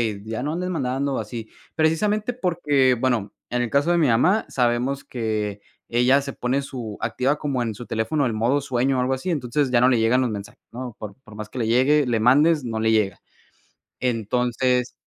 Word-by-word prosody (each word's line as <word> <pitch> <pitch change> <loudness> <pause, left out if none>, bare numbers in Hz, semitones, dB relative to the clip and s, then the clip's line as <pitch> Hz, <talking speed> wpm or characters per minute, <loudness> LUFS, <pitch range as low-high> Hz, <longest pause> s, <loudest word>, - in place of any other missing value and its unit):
"Hey, 100 - -11
ya 110 +2 -4
no 150 +2 -2
andes 180 +2 -3
mandando 135 -4 -1
así". 115 -3 -6 0.3
Precisamente 205 +8 +1
porque, 155 - +2
bueno, 120 -4 0 0.2
en 125 0 0
el 120 - -3
caso 140 +6 +2
de 175 - +3
mi 160 -4 +3
mamá, 170 - +3
sabemos 125 +2 0
que 110 -4 -3 0.3
ella 125 +4 +3
se 140 0 -5
pone 130 +2 -1
su 120 -6 -7
activa 135 +3 0
como 140 -5 -2
en 115 -3 -2
su 120 - -9
teléfono 135 +7 -1
el 120 - 0
modo 120 +6 +1
sueño 130 0 0
o - - +2
algo 130 +1 +1
así. 130 +7 -4
Entonces, 140 -3 0
ya 120 -1 +4
no 125 - +5
le 125 -3 +3
llegan 115 +3 +3
los 125 - 0
mensajes, 100 -2 -8
¿no? 125 -1 -7
Por 105 -2 -8
por 110 - -14
más 105 0 -7
que 130 - -7
le 115 - 0
llegue, 135 +5 +3
le 115 -3 +1
mandes, 145 +6 +4
no 115 -2 -3
le 110 0 +2
llega, 105 -4 +1 0.8
entonces 125 +1 0
125 Hz, 205 wpm, -23 LUFS, 115-140 Hz, 0.8 s, no